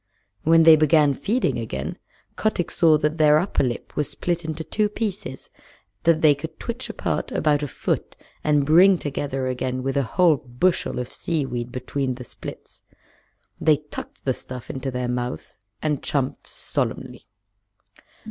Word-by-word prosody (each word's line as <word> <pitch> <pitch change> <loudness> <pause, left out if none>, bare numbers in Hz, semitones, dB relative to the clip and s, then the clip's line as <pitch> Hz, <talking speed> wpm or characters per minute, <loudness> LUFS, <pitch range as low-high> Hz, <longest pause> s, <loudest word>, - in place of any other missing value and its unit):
When 165 +1 +5
they 160 -1 +9
began 155 -1 +4
feeding 225 - 0
again - - -4 0.4
Kotick 215 -5 -1
saw 160 -2 +5
that 150 +2 -1
their 150 -1 +6
upper 180 +6 +1
lip 120 -2 -4
was 150 - 0
split 175 -1 -2
into 160 0 -4
two 210 +6 0
pieces 200 - -5 0.5
that 165 -1 +4
they 155 -2 +7
could 145 +3 -8
twitch 235 +2 -5
apart - - -2
about 150 -2 +2
a 145 - -2
foot - - -3 0.3
and 150 -2 +3
bring 180 +5 +6
together 140 -3 -3
again 130 0 -2
with 135 0 -1
a 140 - +3 0.2
whole 175 -5 +6
bushel 135 +7 0
of 125 0 -4
seaweed 125 -7 -2
between 130 +1 -2
the 125 - -8
splits. - - -10 0.8
They 155 -2 +4
tucked 150 0 -10
the 130 - +2
stuff 125 -1 -8
into 135 0 -4
their 125 -1 -2
mouths 125 -3 -4 0.2
and 150 -3 0
chumped 135 -3 -2
solemnly. - - -3
150 Hz, 155 wpm, -23 LUFS, 130-165 Hz, 0.8 s, they